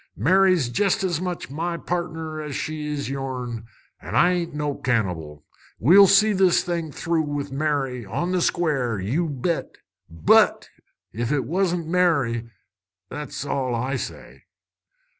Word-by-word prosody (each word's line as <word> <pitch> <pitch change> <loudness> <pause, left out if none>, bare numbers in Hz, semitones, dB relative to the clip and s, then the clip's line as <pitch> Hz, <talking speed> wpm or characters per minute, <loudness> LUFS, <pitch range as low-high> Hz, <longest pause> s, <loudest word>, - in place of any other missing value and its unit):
"Mary's 180 - +3
jest 195 - +1
as 175 -3 -1
much 180 -6 -4
my 170 +3 -2
pardner 160 -3 -4
as 150 -3 -6
she 155 -1 -4
is 145 -1 -3
yourn, 125 -4 -5 0.3
an' - - -6
I 175 - +5
ain't 170 -3 -2
no 150 -1 -1
cannibal. 90 - -2 0.3
We'll 195 - +7
see 210 +3 +5
this 185 -2 +3
thing 170 -3 -3
through 165 +2 -1
with 145 -2 -4
Mary, 135 -4 -1
on 115 - -3
the 185 -1 +1
square, 135 - 0
you 140 - -1
bet. 150 +5 -2 0.3
But 80 -1 +3 0.5
ef 115 +3 -2
'twasn't 170 +5 0
Mary 145 -10 +1 0.6
that's 145 -1 -6
all 130 -4 -1
I 130 +3 -2
say!" - - -8
150 Hz, 140 wpm, -23 LUFS, 125-175 Hz, 0.6 s, We'll